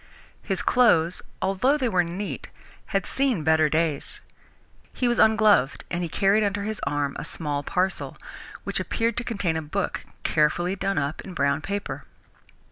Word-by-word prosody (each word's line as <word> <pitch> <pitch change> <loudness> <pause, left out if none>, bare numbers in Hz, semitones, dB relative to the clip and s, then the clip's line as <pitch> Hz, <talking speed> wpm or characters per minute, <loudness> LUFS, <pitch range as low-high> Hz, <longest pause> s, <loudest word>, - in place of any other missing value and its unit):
His - - -1
clothes, 180 -9 +4 0.2
although 195 +10 +2
they 260 -4 0
were 185 -5 +2
neat, 180 +4 -5 0.4
had 195 -3 -1
seen 260 - 0
better 160 -1 +4
days. 155 -2 -1 0.7
He 250 - 0
was 240 -1 +1
ungloved, 215 -11 +4
and 175 - -1
he 170 - -2
carried 200 +5 +3
under 205 0 -1
his 215 0 -4
arm 145 -1 -1
a - - -4
small 145 -3 -2
parcel, 185 +5 -1 0.5
which - - -2
appeared 230 0 -1
to 235 - +1
contain 200 -9 -1
a 160 - -1
book, 180 +6 -3 0.2
carefully 175 +4 +1
done 195 -1 -1
up 145 +2 -1
in 185 - -9
brown 140 0 +1
paper. 200 +4 -4
185 Hz, 160 wpm, -25 LUFS, 155-210 Hz, 0.7 s, clothes